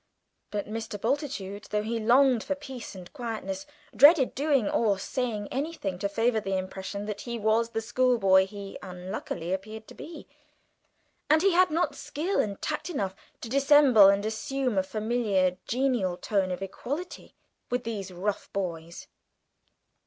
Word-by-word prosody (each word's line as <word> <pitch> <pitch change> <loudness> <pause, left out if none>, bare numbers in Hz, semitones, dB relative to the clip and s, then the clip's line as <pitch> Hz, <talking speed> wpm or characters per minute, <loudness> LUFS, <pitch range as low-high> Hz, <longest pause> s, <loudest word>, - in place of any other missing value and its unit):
But 205 -1 -3
Mr. 215 -1 -5
Bultitude, 225 -6 -2
though 210 0 0
he 230 +1 -2
longed 245 +1 +4
for 285 - -2
peace 265 -7 -8
and 180 -2 -11
quietness, 280 +4 -5 0.3
dreaded 290 -1 +7
doing 275 -5 +2
or 210 -4 +2
saying 215 0 -3
anything 270 - -3
to 200 0 -1
favour 225 +2 +1
the 195 -2 -2
impression 190 +2 -5
that 210 -1 -5
he 235 -1 -4
was 220 +1 +2
the 225 -1 -2
schoolboy 225 -6 +3
he 200 -1 -8
unluckily 180 -1 -5
appeared 215 +3 -6
to - - -11
be, 320 -3 -10 1.0
and 315 +2 +5
he 390 -2 +4
had 365 +1 +5
not 330 +3 0
skill 340 +7 -2
and 200 -2 -1
tact 305 +3 -2
enough 200 - -2 0.3
to - - -6
dissemble 275 -6 +7
and 200 +1 +2
assume 250 +3 -2
a - - +4
familiar 210 -3 0
genial 240 -8 0
tone 195 -2 0
of 180 +1 -3
equality 285 - -6 0.3
with 245 0 -1
these 210 -4 -4
rough 195 +3 -3
boys. 170 -3 -4
220 Hz, 150 wpm, -28 LUFS, 195-265 Hz, 1.0 s, dreaded